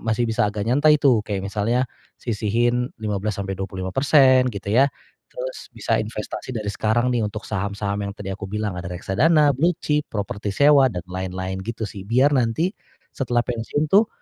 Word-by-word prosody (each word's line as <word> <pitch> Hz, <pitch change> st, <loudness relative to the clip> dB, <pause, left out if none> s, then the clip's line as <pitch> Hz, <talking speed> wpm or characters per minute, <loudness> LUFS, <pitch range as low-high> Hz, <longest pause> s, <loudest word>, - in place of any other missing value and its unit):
masih 115 Hz, +1 st, 0 dB
bisa 110 Hz, -2 st, +1 dB
agak 105 Hz, 0 st, -3 dB
nyantai 150 Hz, +5 st, +5 dB
tuh, 130 Hz, -6 st, +4 dB
kayak 100 Hz, -2 st, -2 dB
misalnya 110 Hz, +5 st, 0 dB, 0.4 s
sisihin 120 Hz, +2 st, 0 dB
15 105 Hz, 0 st, -2 dB
sampai 95 Hz, -1 st, -3 dB
25% 130 Hz, +8 st, +3 dB
gitu 100 Hz, -2 st, -7 dB
ya 135 Hz, +5 st, +5 dB, 0.4 s
terus -, -, -6 dB
bisa -, -, 0 dB
investasi 130 Hz, -, -5 dB
dari 105 Hz, -2 st, -3 dB
sekarang 120 Hz, +5 st, +1 dB
nih, 120 Hz, -, +1 dB
untuk 105 Hz, 0 st, -4 dB
saham-saham 100 Hz, 0 st, -2 dB
yang 100 Hz, -, -4 dB
tadi 95 Hz, -2 st, -5 dB
aku 100 Hz, 0 st, -6 dB
bilang 105 Hz, -2 st, -2 dB
ada 85 Hz, -, -6 dB
reksadana, 145 Hz, -, +3 dB
blue 170 Hz, +6 st, +3 dB
chip, 150 Hz, 0 st, 0 dB
properti 105 Hz, 0 st, -3 dB
sewa 140 Hz, 0 st, +6 dB
dan 90 Hz, -3 st, -5 dB
lain-lain 95 Hz, 0 st, -4 dB
gitu 115 Hz, 0 st, -4 dB
sih. 100 Hz, -, -9 dB
Biar 130 Hz, +6 st, +3 dB
nanti 130 Hz, +8 st, +1 dB, 0.4 s
setelah 120 Hz, -2 st, 0 dB
pensiun 125 Hz, +6 st, -2 dB
tuh 210 Hz, +3 st, +6 dB
110 Hz, 170 wpm, -22 LUFS, 100-130 Hz, 0.4 s, sewa